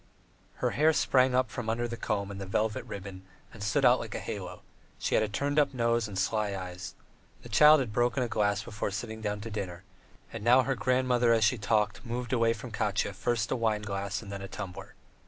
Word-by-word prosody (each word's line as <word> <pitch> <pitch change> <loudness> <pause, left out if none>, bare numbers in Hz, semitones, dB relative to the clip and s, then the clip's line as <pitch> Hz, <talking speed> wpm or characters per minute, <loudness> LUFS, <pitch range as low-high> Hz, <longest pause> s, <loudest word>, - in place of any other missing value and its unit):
Her - - -1
hair 155 +2 +3
sprang 130 -3 +3
up 130 0 +1
from 120 -4 -4
under 120 +2 0
the 120 - -5
comb 100 -3 -2
and 100 0 -7
the 95 - -6
velvet 105 +3 -1
ribbon 95 -1 -8 0.3
and 110 - -11
stood 105 0 +1
out - - +6
like - - -6
a - - -2
halo; - - -6 0.3
she - - -2
had - - +4
a - - 0
turned 145 +8 0
up 140 -2 +2
nose 115 -2 +1
and 100 -2 -7
sly 100 +1 0
eyes. 90 -1 -7 0.5
The 120 - -10
child 150 +6 +7
had 115 -5 -4
broken 120 +2 +1
a - - -1
glass 105 -2 0
before 105 -1 -3
sitting 110 +2 -5
down 105 -1 -3
to 115 +2 -7
dinner, 95 -4 -5 0.5
and 115 - -6
now 125 +3 +6
her 135 +2 0
grandmother, 125 +1 +2
as 115 -1 +3
she 110 +2 +3
talked, 105 0 0
moved 120 0 -4
away 115 -2 +3
from 115 +2 -9
Katya 105 -2 -1
first 115 +2 -1
a - - +2
wineglass 105 -3 -2
and 100 - -9
then 100 0 -5
a 95 - -6
tumbler. 95 -1 -8
110 Hz, 220 wpm, -29 LUFS, 100-120 Hz, 0.5 s, child